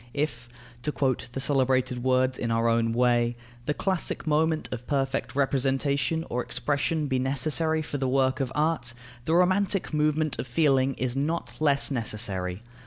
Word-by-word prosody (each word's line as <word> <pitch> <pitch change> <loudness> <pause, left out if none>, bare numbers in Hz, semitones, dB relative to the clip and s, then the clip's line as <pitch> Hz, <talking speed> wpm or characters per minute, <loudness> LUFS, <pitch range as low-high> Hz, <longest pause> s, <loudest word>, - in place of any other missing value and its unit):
If 120 -5 -2 0.3
(to 150 - -1
quote 130 -4 -1
the 135 - -3
celebrated 130 -2 +1
words 130 0 +2
in 115 - -1
our 115 0 +1
own 115 0 +2
way) 120 0 +2 0.3
the 150 - 0
classic 190 -4 -1
moment 155 +1 +1
of 125 -1 -6
perfect 135 -1 -1
representation 140 +3 +1
or 125 - -1
expression 150 +2 -1
be 130 -2 0
necessary 155 +4 +1
for 145 -1 -4
the 130 -1 0
work 130 0 +2
of 130 -2 -1
art, 150 -6 0 0.3
the 160 - +2
romantic 185 +1 +2
moment 150 0 +1
of - - -3
feeling 135 -1 +2
is 125 0 -2
not 155 +5 -2
less 145 -2 +2
necessary. 105 -5 -2
135 Hz, 160 wpm, -27 LUFS, 125-150 Hz, 0.3 s, words